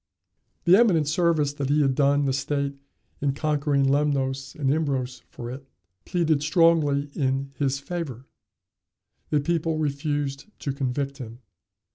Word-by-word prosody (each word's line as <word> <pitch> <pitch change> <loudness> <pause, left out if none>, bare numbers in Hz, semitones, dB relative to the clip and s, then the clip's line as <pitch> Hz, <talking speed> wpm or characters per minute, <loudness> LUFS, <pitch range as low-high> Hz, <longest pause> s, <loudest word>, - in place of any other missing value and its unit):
The 185 +4 +7
eminent 175 -11 +4
service 155 -2 +2
that 140 -2 -3
he 150 +1 +3
had 135 -1 +2
done 140 +1 +3
the 135 - +1
state 140 +1 -1 0.5
in 140 -1 +1
conquering 145 -1 +1
Lemnos 135 -1 0
and 140 -4 0
Imbros 130 -5 -2
for 120 0 -7
it, 135 +1 -9 0.4
pleaded 165 -5 +1
strongly 155 -3 +3
in 135 0 -1
his 140 -1 0
favor. 140 -6 -5 1.0
The 150 -1 +2
people 165 +1 0
refused 145 -1 -2 0.2
to 140 - -2
convict 140 +1 -2
him. 120 0 -9
140 Hz, 135 wpm, -25 LUFS, 135-155 Hz, 1.0 s, The